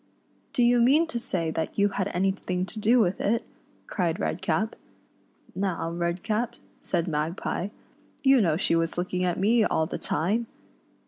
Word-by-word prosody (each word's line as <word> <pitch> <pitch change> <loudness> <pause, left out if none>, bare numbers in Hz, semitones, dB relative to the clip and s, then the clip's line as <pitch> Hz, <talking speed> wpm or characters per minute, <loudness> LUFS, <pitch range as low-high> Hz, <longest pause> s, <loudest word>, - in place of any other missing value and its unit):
" - - -38
Do 245 - +3
you 240 0 +5
mean 285 +8 +5
to 240 - -2
say 170 -8 -2
that 160 0 -3
you 205 0 +4
had 195 -1 -1
anything 185 -1 -1
to 215 +4 -8
do 230 +4 +4
with 190 -4 +1
it 230 +3 +1 0.2
?" - - -34
cried 175 -4 -1
Redcap. 175 +6 -1 0.4
" - - -31
Now, 185 -4 -1
Redcap," 180 +8 -1 0.3
said 170 -2 -1
Magpie, 165 +3 -2 0.3
" - - -33
you 270 -2 +6
know 165 -6 +2
she 165 - +1
was 165 0 0
looking 180 +1 -1
at 175 -2 0
me 220 +4 +4
all 160 - +1
the - - -5
time 215 +8 0
190 Hz, 180 wpm, -27 LUFS, 170-225 Hz, 0.4 s, you